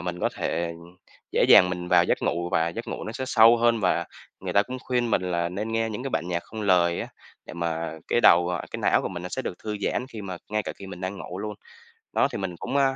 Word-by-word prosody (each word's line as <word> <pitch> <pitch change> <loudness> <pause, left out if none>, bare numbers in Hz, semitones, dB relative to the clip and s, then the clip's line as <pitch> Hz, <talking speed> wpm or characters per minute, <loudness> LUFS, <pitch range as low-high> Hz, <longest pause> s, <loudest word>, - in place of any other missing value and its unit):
mình 90 0 -4
có - - +2
thể 85 0 -2 0.6
dễ - - +3
dàng 90 - +8
mình 90 -1 -4
vào 90 -1 +5
giấc - - +1
ngủ 85 +1 -1
và 80 -2 +2
giấc 85 - -6
ngủ - - -5
nó 110 - -5
sẽ 130 - -4
sâu 115 -1 +6
hơn 115 -1 +2
và 85 -2 +1 0.4
người - - -4
ta 100 - +5
cũng 130 +4 -6
khuyên 125 -3 -1
mình 95 - +2
là 85 -1 -1
nên 105 +5 -4
nghe 115 0 +1
những 110 +3 -5
cái 135 - -4
bản 80 -3 -2
nhạc 85 -1 -1
không 110 -1 -7
lời 90 -3 +3
á, - - -5 0.4
để - - -9
mà 85 -1 -2 0.2
cái - - +2
đầu, 85 -4 +6
ờ 90 -1 -2
cái - - -5
não - - +3
của - - -2
mình 90 -2 -6
nó 90 - -5
sẽ 130 - -4
được - - -4
thư 105 -1 -3
giãn 125 - -1
khi 110 -5 -8
mà 95 -2 -5
ngay 105 0 0
cả - - -5
khi 100 - -9
mình 95 -2 -9
đang 95 +2 -4
ngủ 90 - -7
luôn. 105 +1 -4 0.6
Đó, - - +3
thì - - -4
mình 95 -3 -4
cũng, 140 - -2
à, 135 -1 +3
95 Hz, 280 wpm, -25 LUFS, 85-110 Hz, 0.6 s, dàng